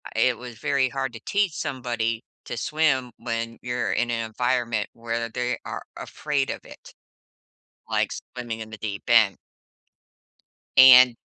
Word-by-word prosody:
it -, -, +3 dB
was 120 Hz, -2 st, -9 dB
very 135 Hz, 0 st, +1 dB
hard 135 Hz, -1 st, -3 dB
to 115 Hz, -, -8 dB
teach 200 Hz, -4 st, +1 dB
somebody 120 Hz, -6 st, -2 dB, 0.2 s
to 120 Hz, -, -5 dB
swim 135 Hz, -4 st, +1 dB
when 115 Hz, -1 st, -4 dB
you're 120 Hz, -1 st, -2 dB
in 120 Hz, -, 0 dB
an 115 Hz, -1 st, -1 dB
environment 120 Hz, -2 st, 0 dB
where 115 Hz, 0 st, -3 dB
they 125 Hz, +1 st, -2 dB
are -, -, -5 dB
afraid 145 Hz, -3 st, -2 dB
of -, -, -5 dB
it, -, -, -14 dB, 1.0 s
like -, -, +1 dB
swimming 120 Hz, -2 st, -7 dB
in 110 Hz, -, -7 dB
the 110 Hz, -, -9 dB
deep 100 Hz, -1 st, -5 dB
end. 110 Hz, -5 st, +6 dB, 1.4 s
And 130 Hz, -2 st, +9 dB
120 Hz, 145 wpm, -25 LUFS, 115-130 Hz, 1.4 s, And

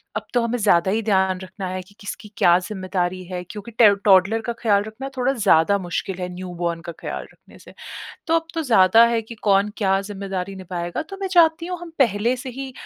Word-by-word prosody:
अब -, -, -3 dB
तो 245 Hz, -, +3 dB
हमें 235 Hz, +1 st, -1 dB
ज़्यादा 190 Hz, -3 st, +3 dB
ही 225 Hz, +2 st, 0 dB
ध्यान 190 Hz, -3 st, +1 dB
रखना 190 Hz, 0 st, -7 dB
है 185 Hz, 0 st, -4 dB
कि 200 Hz, +3 st, -19 dB
किसकी 205 Hz, 0 st, -8 dB
क्या 175 Hz, 0 st, +5 dB
जिम्मेदारी 185 Hz, -2 st, -3 dB
है। 180 Hz, 0 st, -5 dB
क्योंकि 210 Hz, +5 st, -9 dB
ट -, -, +8 dB, 0.2 s
टौडलर 195 Hz, +3 st, +4 dB
का -, -, -1 dB
ख्याल 205 Hz, -3 st, +3 dB
रखना 220 Hz, +6 st, -7 dB
थोड़ा 255 Hz, +2 st, +1 dB
ज़्यादा 200 Hz, -4 st, +3 dB
मुश्किल 180 Hz, +1 st, -4 dB
है 180 Hz, -, -3 dB
न्यूबॉर्न 175 Hz, -2 st, -4 dB
का 170 Hz, -, -7 dB
ख्याल -, -, -5 dB
रखने -, -, -20 dB
से। -, -, -15 dB, 0.5 s
तो 325 Hz, -, +1 dB
अब 325 Hz, 0 st, -1 dB
तो 325 Hz, -, -1 dB
ज़्यादा 225 Hz, -3 st, +6 dB
है 230 Hz, -1 st, 0 dB
कि 230 Hz, +2 st, -10 dB
कौन 200 Hz, 0 st, +3 dB
क्या 195 Hz, -2 st, +1 dB
जिम्मेदारी 195 Hz, -1 st, -4 dB
निभाएगा। 175 Hz, -, -4 dB
तो 390 Hz, +5 st, -10 dB
मैं 385 Hz, -, -2 dB
चाहती 335 Hz, -2 st, +4 dB
हूँ 360 Hz, -1 st, -4 dB
हम 345 Hz, -1 st, -9 dB
पहले 235 Hz, 0 st, +2 dB
से 260 Hz, +1 st, -7 dB
ही 265 Hz, -1 st, -6 dB
200 Hz, 215 wpm, -22 LUFS, 185-235 Hz, 0.5 s, ट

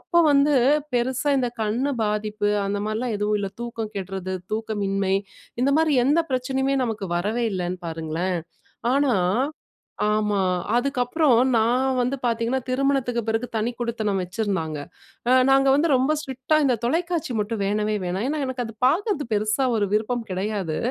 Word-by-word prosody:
அப்போ 345 Hz, -, +1 dB
வந்து 285 Hz, +1 st, +4 dB, 0.4 s
பெருசா 255 Hz, +4 st, +1 dB
இந்த 245 Hz, -2 st, 0 dB
கண்ணு 235 Hz, +7 st, 0 dB
பாதிப்பு 210 Hz, 0 st, -1 dB, 0.2 s
அந்த 200 Hz, +1 st, -1 dB
மாரிலாம் 220 Hz, +2 st, -2 dB
எதுவும் 210 Hz, 0 st, +1 dB
இல்ல. 195 Hz, -, -3 dB
தூக்கம் 225 Hz, -2 st, -5 dB
கெட்றது, 190 Hz, -1 st, -4 dB, 0.2 s
தூக்கமின்மை 200 Hz, -3 st, -1 dB, 0.5 s
இந்த 275 Hz, -, +3 dB
மாரி 320 Hz, -2 st, +3 dB
எந்த 305 Hz, +4 st, +4 dB
பிரச்சனையுமே 265 Hz, +2 st, 0 dB
நமக்கு 225 Hz, -2 st, -2 dB, 0.2 s
வரவே 215 Hz, +7 st, -1 dB
இல்லைன்னு 180 Hz, -1 st, -2 dB
பாருங்களேன். 165 Hz, +2 st, -2 dB, 0.5 s
ஆனா 280 Hz, -3 st, +3 dB, 1.0 s
ஆமா. 210 Hz, -2 st, +1 dB, 0.4 s
அதுக்கப்புறம், 255 Hz, +1 st, +2 dB, 0.2 s
நான் 255 Hz, +4 st, +2 dB
வந்து 250 Hz, +3 st, 0 dB
பார்த்திங்கன்னா, 235 Hz, +2 st, 0 dB
திருமணத்துக்கு 255 Hz, -2 st, +1 dB
பிறகு 225 Hz, +2 st, 0 dB
தனிக்குடித்தனம் 225 Hz, -3 st, -1 dB
வச்சிருந்தாங்க. 180 Hz, -4 st, -2 dB, 0.5 s
அ -, -, +6 dB, 0.2 s
நாங்க 270 Hz, 0 st, +5 dB
வந்து 300 Hz, +4 st, +3 dB
ரொம்ப 265 Hz, +4 st, +3 dB
ஸ்ட்ரிக்ட்டா, 265 Hz, +1 st, -1 dB
"இந்த 260 Hz, -3 st, +3 dB
தொலைக்காட்சி 335 Hz, +1 st, -1 dB
மட்டும் 210 Hz, +1 st, -2 dB
வேணவே 210 Hz, +2 st, 0 dB
வேணா" 180 Hz, +2 st, -2 dB
ஏன்னா, 305 Hz, +2 st, -1 dB
எனக்கு 260 Hz, -1 st, -3 dB
அது 225 Hz, -1 st, -8 dB
பார்க்குறது 335 Hz, -, +1 dB
பெருசா 215 Hz, +5 st, +1 dB
ஒரு 205 Hz, -, +1 dB
விருப்பம் 225 Hz, +3 st, 0 dB
கிடையாது. 190 Hz, -3 st, -2 dB
230 Hz, 140 wpm, -24 LUFS, 205-265 Hz, 1.0 s, அ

